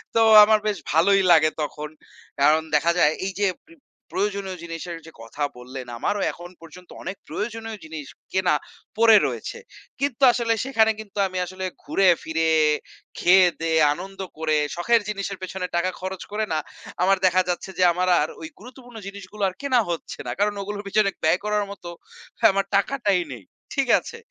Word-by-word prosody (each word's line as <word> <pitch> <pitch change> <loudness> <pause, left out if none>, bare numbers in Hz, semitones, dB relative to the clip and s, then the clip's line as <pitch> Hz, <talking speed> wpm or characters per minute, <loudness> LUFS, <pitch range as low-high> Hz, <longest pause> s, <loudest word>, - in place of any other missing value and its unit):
তো - - +4 0.2
আমার 215 0 +4
বেশ 210 -2 0
ভালোই 195 +6 +4
লাগে 155 -2 +6
তখন। 150 0 -4 0.5
কারণ 150 +3 +5
দেখা 165 +3 +3
যায় 150 - +5
এই 195 - -2
যে 200 - +4 0.2
প - - -29 0.4
প্রয়োজনীয় 195 -1 -2
জিনিসের 170 0 -6
যে 165 - -12
কথা 115 +6 -6
বললেন 125 +1 -8
আমারও 205 - -1
এখন 175 +1 -11
পর্যন্ত 170 +2 -14
অনেক 190 - -5
প্রয়োজনীয় 225 +5 -5
জিনিস 160 -2 -7 0.3
কেনা 185 -5 +2 0.4
পড়ে 225 -1 +7
রয়েছে। - - -5 0.4
কিন্তু 280 -2 -2
আসলে 235 -1 0
সেখানে 225 -5 +3
কিন্তু 210 -2 -11
আমি 185 -1 -6
আসলে 185 +1 -6 0.2
ঘুরে 195 - +2 0.2
ফিরে 160 0 0 0.7
খেয়ে-দেয়ে 175 -3 +4
আনন্দ 195 +4 -9 0.2
করে 155 -1 0 0.2
শখের 230 +7 +2
জিনিসের 200 -1 -4
পেছনে 185 0 -4
টাকা 175 +2 +1
খরচ 190 -1 -5
করে 215 +1 -1
না 155 - +1 0.4
আমার 195 +1 +4
দেখা 185 0 +4
যাচ্ছে 180 +2 -3
যে 185 - +3
আমার 180 +1 -1
আর 155 - -1
ওই 160 - -6
গুরুত্বপূর্ণ 245 0 -13
জিনিসগুলো 200 +1 -7
আর - - -11
কেনা 260 -3 +2
হচ্ছে 170 -1 -5
না। - - -2
কারণ 205 +1 +2
ওগুলোর 205 +1 -6
পিছনে 200 0 +2
ব্যয় 160 +3 +3
করার 210 -1 0
মত 200 - -11 0.7
আমার 195 0 0
টাকাটাই 200 -3 +1
নেই। 115 -5 -11 0.3
ঠিক 275 -2 0
আছে? 465 - -10
190 Hz, 170 wpm, -23 LUFS, 165-210 Hz, 0.7 s, পড়ে